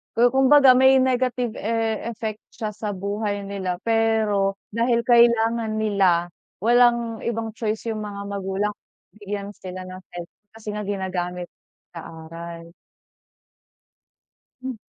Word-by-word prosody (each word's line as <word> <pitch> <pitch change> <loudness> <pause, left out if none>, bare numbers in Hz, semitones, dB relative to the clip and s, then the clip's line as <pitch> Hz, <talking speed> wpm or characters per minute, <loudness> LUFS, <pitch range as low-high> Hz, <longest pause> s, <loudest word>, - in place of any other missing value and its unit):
ku 240 +1 +4
kumbaga 270 0 +6
may 265 +1 +6
negative 250 -2 0
e 225 0 -1
effect 220 -2 -4 0.2
siya 215 -1 -3
sa 205 -1 -5
buhay 205 +1 -3
nila. 195 -2 -3
Pero, 220 -3 +2 0.2
dahil 235 +1 +1
kailangan 235 -2 +3
nila, 190 -5 +2 0.3
walang 235 -1 +3
ibang 225 -1 -2
choice 220 0 -3
yung 215 - -4
mga 200 -1 -6
magulang, 200 +1 -2 0.4
bigyan 205 -1 -5
sila 185 -2 -8
ng 185 0 -9
cell 175 -1 -6 0.3
kasi 215 -1 -6
nga 210 -1 -5
ginagamit, 180 -3 -3 0.4
sa 165 -2 -8 0.2
aral. 170 0 -9 1.9
Hmm. 260 0 -4
215 Hz, 120 wpm, -23 LUFS, 195-230 Hz, 1.9 s, kumbaga